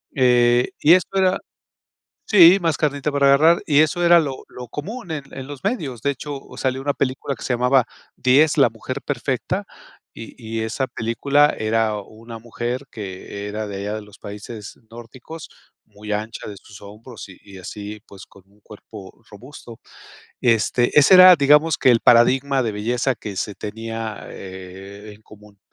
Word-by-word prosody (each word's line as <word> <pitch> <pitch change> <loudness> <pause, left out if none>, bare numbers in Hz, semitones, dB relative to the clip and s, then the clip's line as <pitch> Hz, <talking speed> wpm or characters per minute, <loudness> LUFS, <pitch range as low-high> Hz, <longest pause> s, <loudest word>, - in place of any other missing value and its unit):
eh, 125 -1 +3
y 155 - +6
esto 185 +1 +1
era 185 0 +2 0.9
Sí, 185 -4 +7
más 165 -3 -1
carnita 145 -1 -1
para 140 -1 +2
agarrar 160 +5 +4
y 145 -1 +4
eso 155 +3 +1
era 170 0 +6
lo 135 -4 -5
lo 125 - -10
común 185 - -7
en 145 -3 -5
en 135 -1 -8
los 145 -3 -9
medios, 140 - -3
de 140 - +1
hecho, 140 +1 -7 0.2
salió 130 0 -2
una 145 0 -1
película 135 +1 -3
que - - -13
se 125 - -2
llamaba 125 +1 +2 0.3
10 145 +5 +3
la 130 -5 +5
mujer 130 +4 -7
perfecta, 145 - -3 0.5
y 115 - -10
y 110 0 -4
esa 110 +4 -2
película 140 +6 +1
era 110 0 0
una 115 +3 -12
mujer, 120 +3 -5
que 100 0 -8
era 105 +1 -5
de 100 - -6
allá 105 +2 -4
de - - -6
los 105 -1 -17
países 105 +1 -10
nórdicos, 120 +7 -11 0.4
muy 105 0 -9
ancha 110 +1 -5
de 100 - -9
sus 100 +1 -15
hombros 105 +3 -12
y 95 - -14
y 100 -1 -13
así 105 +3 -8
pues, 100 - -13
con 100 - -20
un 105 +1 -28
cuerpo 105 -1 -14
robusto, 115 +1 -13 0.6
este, 120 +2 +1
ese 145 - +5
era, 185 0 +9
digamos 150 +3 +4
que 130 - +4
el 115 - +2
paradigma 130 +3 +3
de 110 -3 -3
belleza 120 +4 -1
que 105 -3 -8
se 105 - -4
tenía, 110 +1 -7
eh, 95 +2 -11
en 110 - -23
común. 105 -1 -18
120 Hz, 175 wpm, -21 LUFS, 105-140 Hz, 0.9 s, era